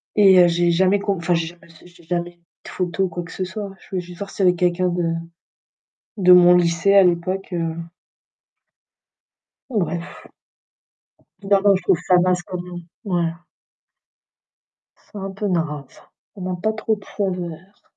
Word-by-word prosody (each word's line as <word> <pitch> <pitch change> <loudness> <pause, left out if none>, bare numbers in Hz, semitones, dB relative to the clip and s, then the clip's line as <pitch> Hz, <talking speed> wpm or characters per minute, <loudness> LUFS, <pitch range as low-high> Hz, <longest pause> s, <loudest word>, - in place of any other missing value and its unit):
Et 195 -3 +6
heu, 175 - +7
j'ai 175 0 +2
jamais 190 +3 +3
com 200 -1 -1
enfin, 170 +1 0
j'ai 165 -1 0
jamais 170 0 -14
s 165 -1 -19
j'ai 175 -1 -18
jamais 175 0 -4 0.3
de - - -9
photo 180 +1 -2
ou - - -3
quoi 175 +1 -5
que 170 - -12
ce 190 - -4
soit. 200 +1 -6
Je 190 - -10
veux - - +1
juste 175 0 -12
voir 200 -1 -5
s'il 195 - -1
y - - +7
avais 180 - +1
quelqu'un 180 +1 +1
de 175 0 -1 1.1
de 180 -2 +5
mon 180 0 +7
lycée 170 +3 +2
à 195 -1 +7
l'époque, 180 +2 0
heu 165 -1 -2 1.9
bref. 175 -7 -3 1.2
Non, 200 -1 +5
non. 200 -1 +5
Je 185 - -2
trouve 180 -3 +2
ça 180 - +5
passe 180 -1 +1
quand 180 0 -6
même. 175 -1 -8 0.2
Ouais. 175 -3 0 1.8
C'est - - -5
un 195 - -4
peu 200 +1 -3
grave 155 -6 -2
ça. - - -21 0.3
On 195 - -10
n'a 185 0 -3
pas 220 +5 -1
trop 220 0 -1
de 200 - -15
faveurs. 185 -1 -5
180 Hz, 180 wpm, -21 LUFS, 175-195 Hz, 1.9 s, heu